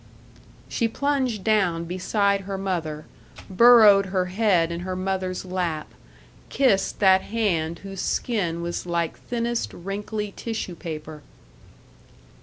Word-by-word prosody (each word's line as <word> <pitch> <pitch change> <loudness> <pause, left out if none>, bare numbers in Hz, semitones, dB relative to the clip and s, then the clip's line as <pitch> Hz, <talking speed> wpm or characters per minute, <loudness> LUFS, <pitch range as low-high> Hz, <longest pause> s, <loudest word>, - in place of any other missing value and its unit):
She 230 - 0
plunged 260 -4 -1
down 185 -6 +1
beside 200 +3 0
her 195 0 -5
mother, 165 -6 -3 0.5
burrowed 210 -2 +7
her 185 -1 0
head 180 -3 +1
in 170 - -4
her 185 +1 -4
mother's 185 0 -3
lap, 175 -4 -3 0.6
kissed 245 -8 +2
that 190 -1 +6
hand 170 -8 -1
whose 195 -1 -6
skin 175 -8 -1
was 175 +1 -4
like 170 -1 -1
thinnest 235 0 -2
wrinkly 205 +3 -5
tissue 225 -5 -4
paper. 155 -3 -7
190 Hz, 115 wpm, -24 LUFS, 170-215 Hz, 0.6 s, burrowed